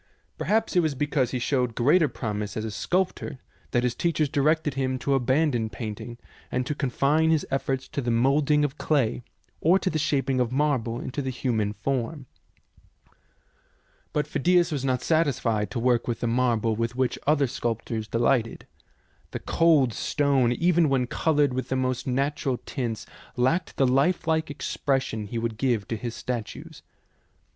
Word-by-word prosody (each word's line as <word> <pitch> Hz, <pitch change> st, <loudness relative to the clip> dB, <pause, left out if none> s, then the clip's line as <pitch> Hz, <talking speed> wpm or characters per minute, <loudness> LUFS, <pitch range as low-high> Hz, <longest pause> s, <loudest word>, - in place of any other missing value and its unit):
Perhaps 220 Hz, -1 st, 0 dB
it -, -, +6 dB
was 155 Hz, -4 st, +1 dB
be 150 Hz, -, 0 dB
cause 140 Hz, -4 st, 0 dB
he 130 Hz, -, -2 dB
showed 125 Hz, -2 st, 0 dB
greater 150 Hz, +7 st, +4 dB
promise 105 Hz, -5 st, -4 dB
as 110 Hz, -, -2 dB
a 110 Hz, -, -4 dB
sculptor 175 Hz, -, -1 dB, 0.3 s
that 120 Hz, -, +1 dB
his 125 Hz, -1 st, +1 dB
teachers 155 Hz, +1 st, 0 dB
directed 150 Hz, +1 st, +1 dB
him 130 Hz, -1 st, -1 dB
to 140 Hz, +2 st, -1 dB
abandon 130 Hz, -2 st, +1 dB
paint 110 Hz, -1 st, -6 dB
ing 120 Hz, -1 st, -8 dB, 0.3 s
and 125 Hz, 0 st, -1 dB
to 150 Hz, -, -2 dB
confine 145 Hz, +3 st, +1 dB
his 160 Hz, -2 st, +2 dB
efforts 135 Hz, -1 st, -1 dB
to 140 Hz, -, -3 dB
the 120 Hz, -, -2 dB
moulding 140 Hz, +5 st, +3 dB
of 145 Hz, +1 st, -5 dB
clay, 135 Hz, -6 st, +1 dB, 0.4 s
or 175 Hz, +4 st, +4 dB
to 190 Hz, -1 st, -1 dB
the 155 Hz, -, -1 dB
shaping 135 Hz, -3 st, 0 dB
of 125 Hz, -1 st, +1 dB
marble 130 Hz, -5 st, 0 dB
into 135 Hz, +3 st, -4 dB
the 130 Hz, -, -3 dB
human 115 Hz, -5 st, -1 dB
form. 135 Hz, +5 st, -3 dB, 1.9 s
But 150 Hz, -1 st, 0 dB
Phidias 175 Hz, +4 st, +2 dB
was 140 Hz, -4 st, -2 dB
not 130 Hz, -2 st, 0 dB
satisfied 125 Hz, -, +1 dB
to 110 Hz, -, -3 dB
work 120 Hz, 0 st, +2 dB
with 120 Hz, -2 st, -2 dB
the -, -, 0 dB
marble 115 Hz, -2 st, +1 dB
with 115 Hz, +2 st, -2 dB
which 130 Hz, -1 st, 0 dB
other 145 Hz, -1 st, +4 dB
sculptors 115 Hz, -3 st, -3 dB
delighted. 115 Hz, 0 st, 0 dB, 0.6 s
The -, -, -5 dB
cold 155 Hz, -8 st, +3 dB
stone, 140 Hz, -3 st, +1 dB
even 170 Hz, +3 st, +3 dB
when 130 Hz, -2 st, +2 dB
coloured 145 Hz, +1 st, +1 dB
with 130 Hz, 0 st, -3 dB
the 130 Hz, -, 0 dB
most 130 Hz, +1 st, -1 dB
natural 135 Hz, 0 st, 0 dB
tints, 120 Hz, -6 st, -4 dB, 0.3 s
lacked 130 Hz, +9 st, 0 dB
the 135 Hz, -, +4 dB
lifelike 160 Hz, +4 st, +1 dB
expression 135 Hz, -6 st, -2 dB
he 115 Hz, -, -4 dB
would 115 Hz, -1 st, -3 dB
give 120 Hz, -7 st, 0 dB
to 115 Hz, -, -1 dB
his 120 Hz, +1 st, -5 dB
statues. 120 Hz, -4 st, -6 dB
130 Hz, 170 wpm, -26 LUFS, 120-150 Hz, 1.9 s, it